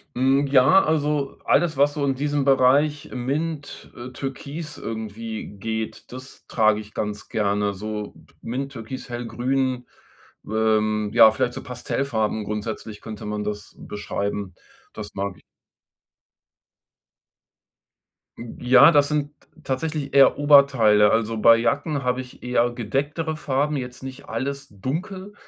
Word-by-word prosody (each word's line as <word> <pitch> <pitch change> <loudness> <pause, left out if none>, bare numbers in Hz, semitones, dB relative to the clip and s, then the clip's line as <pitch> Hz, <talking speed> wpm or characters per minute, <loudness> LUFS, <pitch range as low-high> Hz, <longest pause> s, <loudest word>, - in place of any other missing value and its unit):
Mhm, 135 +3 +2
ja, 140 +8 +5
also 150 -3 0
alles, 155 -1 +2
was 145 +1 +3
so 145 - -3
in 135 - 0
diesem 145 +1 -1
Bereich 140 +2 +3
Mint, 145 +4 -4
äh, 120 +1 -8
Türkis 140 +4 -6
irgendwie 110 0 -6
geht, 110 +3 -5
das 130 +1 -11
trage 110 -2 +2
ich 105 0 -11
ganz 105 -1 -4
gerne. 100 -1 0
So 105 +1 -6 0.3
Mint, 135 +3 -4
Türkis, 125 +2 -8
Hellgrün, 125 +1 -2 0.6
ähm, 110 -1 +1
ja, 115 -1 +8
vielleicht 120 +2 -1
so - - -6
Pastellfarben 120 -3 -2
grundsätzlich 105 0 -5
könnte 110 -2 -8
man 105 0 -3
das 105 0 -6
beschreiben, 100 -2 -4 0.4
das 105 -1 -8
mag 100 -1 -4
ich. - - -21 3.0
Hm, 115 -1 -9
ja, 130 +6 +7
das 145 -2 +4
sind 150 -1 -1 0.3
tatsächlich 145 +1 -3
eher 140 -1 +6
Oberteile. 135 -8 +5
Also, 115 0 0
bei 115 +1 +6
Jacken 140 +5 -1
habe 125 +1 0
ich 125 - -14
eher 120 -1 +1
gedecktere 145 +7 -2
Farben, 145 0 -1
jetzt 125 -1 -7
nicht 135 +1 -9
alles 140 +4 -4
dunkel. 185 - -5
125 Hz, 130 wpm, -23 LUFS, 110-140 Hz, 3.0 s, ja